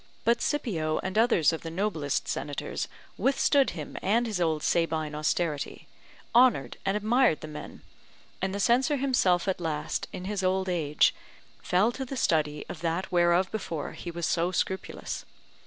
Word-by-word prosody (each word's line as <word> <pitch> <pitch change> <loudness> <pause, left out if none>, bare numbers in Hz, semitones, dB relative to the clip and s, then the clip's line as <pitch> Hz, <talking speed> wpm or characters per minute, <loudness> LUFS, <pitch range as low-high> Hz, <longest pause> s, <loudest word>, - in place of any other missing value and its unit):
But 235 +1 +3
Scipio 165 - 0
and 190 +1 -3
others 220 - +4
of 160 - -4
the 165 - -6
noblest 165 -5 -1
senators 145 -1 -3 0.3
withstood 275 0 +3
him 150 - -6
and 230 +5 +2
his 210 -6 -2
old 160 -3 +1
Sabine 160 -3 0
austerity; 155 0 -2 0.5
honoured 235 - +4
and 195 +2 +2
admired 225 -3 +3
the - - -6
men; 150 -1 -9 0.6
and 190 0 0
the 200 - -3
censor 255 +8 +3
himself 220 -10 +2
at 185 -2 -1
last, 155 -2 -2
in 180 - -6
his 200 0 -2
old 190 +1 +1
age, 155 -4 +2 0.5
fell 195 +6 +2
to 265 - -5
the 265 +1 -6
study 150 -8 +1
of 160 - -8
that 170 +3 -2
whereof 175 +1 +3
before 170 -8 -4
he 175 - -7
was 170 0 -3
so 170 +1 +1
scrupulous. 190 +1 -3
180 Hz, 160 wpm, -28 LUFS, 160-220 Hz, 0.6 s, others